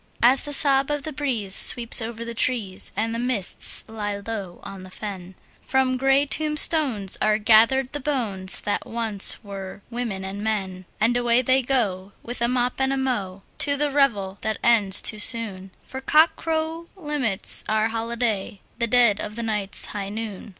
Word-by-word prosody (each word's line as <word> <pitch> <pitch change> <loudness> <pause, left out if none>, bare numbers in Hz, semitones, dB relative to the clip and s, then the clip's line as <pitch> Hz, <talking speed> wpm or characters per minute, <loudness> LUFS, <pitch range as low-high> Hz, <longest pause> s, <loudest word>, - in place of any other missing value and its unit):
As 255 +3 +4
the 290 - -6
sob 275 -2 +3
of 295 -1 -3
the 310 0 -6
breeze 245 -9 -2
sweeps 240 +2 +5
over 230 +1 -6
the 235 - -6
trees, 225 -6 -1
and 225 +2 -2
the 230 - -4
mists 240 -6 +4
lie 210 -2 -5
low 200 -6 -6
on 195 -1 -10
the 185 - -12
fen, 190 -2 -9 0.3
From 265 -1 0
grey 270 +2 +2
tombstones 300 - +2
are 215 0 +2
gathered 230 +5 +3
the 290 - -4
bones 220 -10 -1
that 205 - -3
once 225 -2 0
were 195 -1 -9
women 230 -6 -5
and 200 +2 -6
men, 190 -4 -4
And 230 +3 +1
away 240 +1 +1
they 260 +2 +2
go, 205 -7 -2
with 240 0 -7
a 235 - +2
mop 250 +1 -2
and 265 0 +1
a 270 - -1
mow, 205 -8 -3 0.2
to 285 0 +2
the 295 0 -1
revel 205 -9 0
that 220 -1 -3
ends 210 -5 +2
too 215 - +1
soon, 210 -4 +2 0.2
For 265 - -8
cockcrow 320 +2 0
limits 295 - -1
our 215 +1 +1
holiday—the 230 -1 -4
dead 235 -4 +3
of 210 0 -6
the 235 - -5
night's 210 -3 -2
high 200 -2 -5
noon! 215 -1 -7
230 Hz, 170 wpm, -22 LUFS, 205-265 Hz, 0.3 s, sweeps